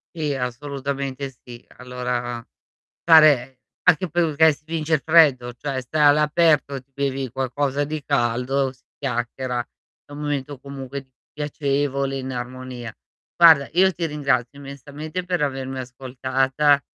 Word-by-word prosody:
Sì, 150 Hz, -4 st, -1 dB
assolutamente 135 Hz, +1 st, -4 dB
sì. 120 Hz, -1 st, -12 dB
Allora 125 Hz, -1 st, -4 dB, 0.6 s
stare 145 Hz, -6 st, +5 dB, 0.2 s
anche 175 Hz, +2 st, +3 dB
perché 160 Hz, -1 st, +3 dB
si 145 Hz, -, -14 dB
vince 160 Hz, 0 st, -1 dB
il 145 Hz, -, 0 dB
freddo, 145 Hz, -7 st, +4 dB
cioè 130 Hz, +1 st, -4 dB
sta 150 Hz, +4 st, 0 dB
all'aperto, 150 Hz, -2 st, +3 dB
ti 135 Hz, +1 st, -32 dB
bevi 135 Hz, -2 st, -2 dB
qualcosa 135 Hz, +2 st, -1 dB
di 155 Hz, +1 st, -4 dB
caldo, 130 Hz, +1 st, 0 dB
si 130 Hz, -, -29 dB
chiacchiera; 125 Hz, -1 st, -3 dB, 0.4 s
è -, -, -16 dB
un 145 Hz, -, -8 dB
momento 145 Hz, -2 st, -3 dB
comunque 135 Hz, -1 st, -8 dB, 0.2 s
piacevole, 140 Hz, -2 st, -1 dB
in 130 Hz, 0 st, -5 dB
armonia. 125 Hz, -2 st, -7 dB, 0.4 s
Guarda, 160 Hz, -5 st, +7 dB
io 190 Hz, +3 st, +4 dB
ti 170 Hz, -1 st, -2 dB
ringrazio 140 Hz, -4 st, -1 dB
immensamente 145 Hz, +5 st, -7 dB
per 180 Hz, -3 st, -1 dB
avermi 135 Hz, -1 st, -3 dB
ascoltata 130 Hz, +3 st, +1 dB
140 Hz, 125 wpm, -22 LUFS, 130-150 Hz, 0.6 s, Guarda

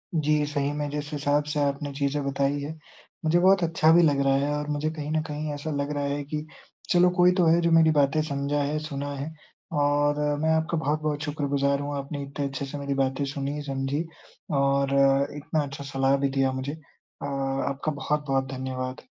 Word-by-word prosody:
जी। 150 Hz, -1 st, +2 dB
सही 145 Hz, -1 st, -1 dB
में 150 Hz, 0 st, -2 dB
जिस 150 Hz, +1 st, -4 dB
हिसाब 145 Hz, 0 st, +1 dB
से 150 Hz, -, -1 dB
आपने 140 Hz, +1 st, -1 dB
चीज़ें 140 Hz, +1 st, -1 dB
बताई 140 Hz, +1 st, 0 dB
हैं, 155 Hz, +2 st, -6 dB, 0.5 s
मुझे 165 Hz, +2 st, +4 dB
बहुत 190 Hz, +1 st, +5 dB
अच्छा 160 Hz, -1 st, +3 dB
भी 170 Hz, -, +7 dB
लग 145 Hz, -3 st, +3 dB
रहा 135 Hz, 0 st, +4 dB
है 140 Hz, +1 st, +1 dB
और 150 Hz, 0 st, -4 dB
मुझे 150 Hz, +1 st, -1 dB
कहीं 155 Hz, -1 st, -5 dB
न 155 Hz, -, +1 dB
कहीं 150 Hz, 0 st, -4 dB
ऐसा 145 Hz, +2 st, -4 dB
लग 140 Hz, 0 st, -2 dB
रहा 145 Hz, -, -1 dB
है 140 Hz, +1 st, -2 dB
कि 150 Hz, +1 st, -4 dB, 0.4 s
चलो, 180 Hz, -2 st, +5 dB
कोई 180 Hz, 0 st, +4 dB
तो 180 Hz, -, +4 dB
है 165 Hz, +1 st, +5 dB
जो 170 Hz, -, +2 dB
मेरी 165 Hz, -1 st, +6 dB
बातें 145 Hz, +1 st, +3 dB
समझा 140 Hz, +1 st, -1 dB
है, 150 Hz, +2 st, -1 dB
सुना 145 Hz, -2 st, -4 dB
है। 140 Hz, +3 st, -5 dB, 0.5 s
और 145 Hz, 0 st, +2 dB, 0.2 s
मैं 160 Hz, -, +2 dB
आपका 160 Hz, +1 st, 0 dB
बहुत-बहुत 150 Hz, 0 st, -1 dB
शुक्रगुज़ार 140 Hz, -2 st, 0 dB
हूँ, 145 Hz, 0 st, -3 dB
आपने 140 Hz, +1 st, -5 dB
इतने 140 Hz, +1 st, -4 dB
अच्छे 140 Hz, 0 st, -4 dB
से 135 Hz, +1 st, -6 dB
मेरी 140 Hz, -1 st, -2 dB
बातें 135 Hz, +1 st, 0 dB
सुनी, 140 Hz, +1 st, -3 dB
समझी 135 Hz, +3 st, -2 dB, 0.6 s
और 140 Hz, 0 st, +2 dB
अ, 140 Hz, 0 st, +4 dB
इतना 150 Hz, +1 st, -1 dB
अच्छा 140 Hz, 0 st, -7 dB
सलाह 135 Hz, -1 st, +1 dB
भी 140 Hz, 0 st, +1 dB
दिया 135 Hz, -1 st, +1 dB
मुझे। 130 Hz, +2 st, -3 dB
अ, 155 Hz, -2 st, -13 dB
आपका 135 Hz, +1 st, -2 dB
बहुत-बहुत 140 Hz, -1 st, -1 dB
धन्यवाद। 130 Hz, 0 st, -4 dB
145 Hz, 200 wpm, -26 LUFS, 140-150 Hz, 0.6 s, भी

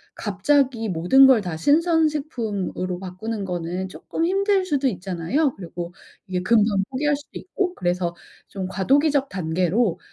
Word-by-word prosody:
갑자기 230 Hz, +3 st, +1 dB
모든 180 Hz, +11 st, +5 dB
걸 250 Hz, -5 st, +5 dB
다 175 Hz, -4 st, -4 dB
신선 320 Hz, -, +3 dB
식품으로 210 Hz, -, -3 dB
바꾸는 195 Hz, +3 st, -5 dB
거는 180 Hz, +1 st, -3 dB
쪼끔 325 Hz, -, -3 dB
힘들 390 Hz, +1 st, +2 dB
수도 285 Hz, -5 st, 0 dB
있잖아요. 195 Hz, -, -1 dB
그리고 175 Hz, -1 st, -7 dB, 0.3 s
이게 180 Hz, -1 st, -2 dB
금방 210 Hz, -2 st, +3 dB
포기할 290 Hz, +2 st, +1 dB
수도 290 Hz, -, -12 dB
있고 370 Hz, -1 st, -2 dB
그래서 175 Hz, -1 st, -1 dB, 0.3 s
좀 190 Hz, -2 st, -5 dB
과도기적 275 Hz, +8 st, +2 dB
단계로 180 Hz, +4 st, 0 dB
210 Hz, 315 characters per minute, -23 LUFS, 180-285 Hz, 0.3 s, 모든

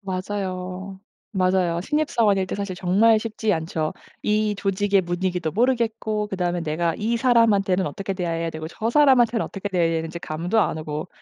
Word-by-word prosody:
맞아요. 190 Hz, -1 st, -4 dB, 0.3 s
맞아요. 185 Hz, -2 st, +1 dB
신입 300 Hz, -, -1 dB
사원일 200 Hz, -4 st, +2 dB
때 -, -, -4 dB
사실 200 Hz, -2 st, -4 dB
정말 205 Hz, +5 st, +4 dB
쉽지 220 Hz, -1 st, -1 dB
않죠. 160 Hz, -1 st, -2 dB, 0.3 s
이 210 Hz, 0 st, +1 dB
조직의 200 Hz, 0 st, +1 dB
분위기도 175 Hz, -1 st, -2 dB
모르겠고 225 Hz, -1 st, 0 dB
그다음에 180 Hz, -3 st, -2 dB
내가 165 Hz, +1 st, -1 dB
이 225 Hz, +2 st, 0 dB
사람한테는 215 Hz, -7 st, +3 dB
어떻게 195 Hz, +6 st, -4 dB
대해야 165 Hz, -3 st, -2 dB
되고 160 Hz, 0 st, -6 dB
저 220 Hz, +6 st, -3 dB
사람한테는 245 Hz, -5 st, +4 dB
어떻게 200 Hz, +1 st, -5 dB
대해야 170 Hz, -3 st, +1 dB
되는지 165 Hz, +1 st, -4 dB
감도 170 Hz, +8 st, -1 dB
안 160 Hz, -, 0 dB
오고 155 Hz, +2 st, -5 dB
190 Hz, 385 characters per minute, -23 LUFS, 175-215 Hz, 0.3 s, 정말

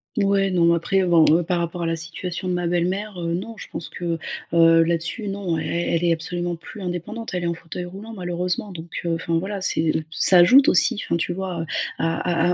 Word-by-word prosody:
Mouais, 195 Hz, -1 st, +2 dB
non 175 Hz, -2 st, +2 dB
mais 170 Hz, 0 st, +5 dB
après, 190 Hz, +3 st, +1 dB
heu, -, -, 0 dB
bon, 170 Hz, -2 st, +5 dB
heu, 170 Hz, +2 st, +4 dB
par 175 Hz, +1 st, -1 dB
rapport 170 Hz, +1 st, -3 dB
à -, -, -1 dB
la 165 Hz, 0 st, 0 dB
situation 170 Hz, +3 st, -5 dB
de 180 Hz, -, 0 dB
ma 175 Hz, 0 st, -1 dB
belle-mère, 180 Hz, +3 st, -1 dB
heu, 170 Hz, 0 st, -1 dB
non, 220 Hz, +6 st, -6 dB
je -, -, -9 dB
pense 165 Hz, -, -5 dB
que, 170 Hz, -2 st, -3 dB, 0.4 s
heu, 165 Hz, 0 st, +6 dB
là-dessus, 170 Hz, +6 st, -1 dB
non, 195 Hz, -5 st, -2 dB
e -, -, -3 dB
elle 170 Hz, 0 st, -1 dB
est 170 Hz, -, +3 dB
absolument 175 Hz, +1 st, -2 dB
plus 185 Hz, +5 st, -11 dB
indépendante. 185 Hz, +5 st, -5 dB
Elle 180 Hz, -, -2 dB
est -, -, 0 dB
en 170 Hz, -, 0 dB
fauteuil 170 Hz, +1 st, -7 dB
roulant 200 Hz, +5 st, -9 dB
malheureusement 180 Hz, +1 st, -3 dB
donc, 170 Hz, -1 st, -9 dB, 0.2 s
heu, 170 Hz, -, 0 dB
enfin 165 Hz, 0 st, -1 dB
voilà, 195 Hz, +3 st, -3 dB
c'est 160 Hz, -3 st, +1 dB
heu, 160 Hz, -, -1 dB
ça 180 Hz, +3 st, +5 dB
ajoute 255 Hz, +11 st, +7 dB
aussi, 240 Hz, -4 st, +3 dB
enfin -, -, 0 dB
tu 170 Hz, +1 st, -2 dB
vois, 185 Hz, -2 st, -4 dB
heu, -, -, -4 dB, 0.3 s
à 165 Hz, 0 st, 0 dB, 0.3 s
à 180 Hz, -, +3 dB
175 Hz, 240 wpm, -22 LUFS, 170-190 Hz, 0.4 s, ajoute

